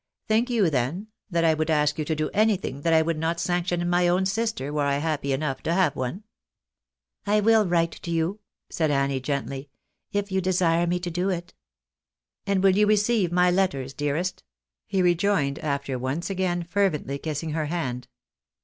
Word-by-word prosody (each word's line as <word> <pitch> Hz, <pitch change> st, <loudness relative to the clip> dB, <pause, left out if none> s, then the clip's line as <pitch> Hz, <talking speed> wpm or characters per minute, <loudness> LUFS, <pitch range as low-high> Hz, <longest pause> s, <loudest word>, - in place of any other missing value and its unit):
Think 225 Hz, +3 st, +2 dB
you, 215 Hz, -9 st, +2 dB
then, 150 Hz, -, -1 dB, 0.2 s
that 170 Hz, -3 st, +1 dB
I 160 Hz, -, +5 dB
would 155 Hz, 0 st, -1 dB
ask 150 Hz, -1 st, +2 dB
you 155 Hz, -, -1 dB
to 160 Hz, -, -1 dB
do 155 Hz, 0 st, -2 dB
anything 200 Hz, -10 st, +1 dB
that 165 Hz, -, +1 dB
I 160 Hz, 0 st, +5 dB
would 160 Hz, -1 st, -1 dB
not 165 Hz, +1 st, -1 dB
sanction 175 Hz, 0 st, 0 dB
in 175 Hz, -, -1 dB
my 175 Hz, 0 st, +3 dB
own 180 Hz, +2 st, +2 dB
sister, 195 Hz, -, -2 dB
were 150 Hz, -, 0 dB
I 140 Hz, 0 st, +1 dB
happy 145 Hz, -2 st, -1 dB
enough 135 Hz, 0 st, -2 dB
to 165 Hz, -, -1 dB
have 185 Hz, -6 st, +2 dB
one? 130 Hz, -, -4 dB, 0.3 s
" -, -, -65 dB
" -, -, -65 dB
I 210 Hz, +1 st, +3 dB
will 220 Hz, -1 st, +4 dB
write 170 Hz, -1 st, +2 dB
to -, -, -7 dB
you," 170 Hz, +5 st, -1 dB, 0.3 s
said 160 Hz, -2 st, -1 dB
Annie, 140 Hz, -1 st, +1 dB
gently, 140 Hz, 0 st, -4 dB, 0.2 s
" -, -, -55 dB
if 205 Hz, 0 st, -2 dB
you 190 Hz, 0 st, +1 dB
desire 175 Hz, -2 st, +2 dB
me 180 Hz, +1 st, 0 dB
to 175 Hz, -1 st, -4 dB
do 180 Hz, +3 st, -1 dB
it." 175 Hz, -1 st, -4 dB, 0.9 s
"And 195 Hz, -1 st, +1 dB
will 190 Hz, -1 st, +5 dB
you 210 Hz, +1 st, +4 dB
receive 210 Hz, -3 st, +2 dB
my 180 Hz, 0 st, +4 dB
letters, 140 Hz, -8 st, 0 dB
dearest? 150 Hz, +6 st, -2 dB, 0.2 s
" -, -, -66 dB
he 190 Hz, -1 st, +1 dB
rejoined, 175 Hz, -5 st, +1 dB
after 140 Hz, -3 st, -2 dB
once 135 Hz, +9 st, -3 dB
again 180 Hz, -2 st, -1 dB
fervently 170 Hz, -6 st, -1 dB
kissing 155 Hz, +1 st, -4 dB
her 155 Hz, -1 st, -1 dB
hand. 130 Hz, -7 st, -3 dB
170 Hz, 200 wpm, -25 LUFS, 145-190 Hz, 0.9 s, I